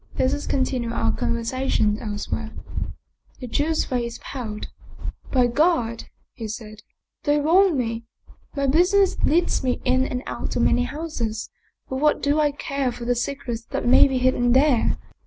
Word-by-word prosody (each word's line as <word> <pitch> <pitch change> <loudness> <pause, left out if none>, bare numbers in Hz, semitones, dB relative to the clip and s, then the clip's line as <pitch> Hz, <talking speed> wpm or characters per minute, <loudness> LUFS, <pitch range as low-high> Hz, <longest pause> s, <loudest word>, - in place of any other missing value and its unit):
Let 260 - +2
us 290 - -3
continue 255 -3 0
our 115 - 0
conversation 230 - 0
else 210 -2 -5
where." 225 -1 -2 0.9
The 255 - -6
Jew's 300 +6 0
face 240 -2 -3
paled. 220 -6 -5 0.3
" - - -9
By 255 -2 +4
God! 245 -3 +1
" - - -44
he 220 - -2
said, 215 0 -7 0.2
" - - -60
they 295 0 +3
wrong 340 +2 +4
me. 230 -2 -2 0.5
My 280 -1 0
business 360 +7 +4
leads 340 -1 +2
me 255 -1 0
in 255 +1 +3
and 250 +1 -3
out - - -4
of - - +2
many 245 0 +3
houses; 250 -8 -4 0.4
but 265 - -3
what 300 +2 +3
do 285 +2 +2
I 300 -1 +4
care 275 -2 -2
for 235 0 -7
the 245 - +2
secrets 245 -1 -3
that - - -3
may 245 - +7
be 265 -1 -1
hidden 250 -1 +2
there? 265 -2 +3
255 Hz, 175 wpm, -23 LUFS, 235-290 Hz, 0.9 s, may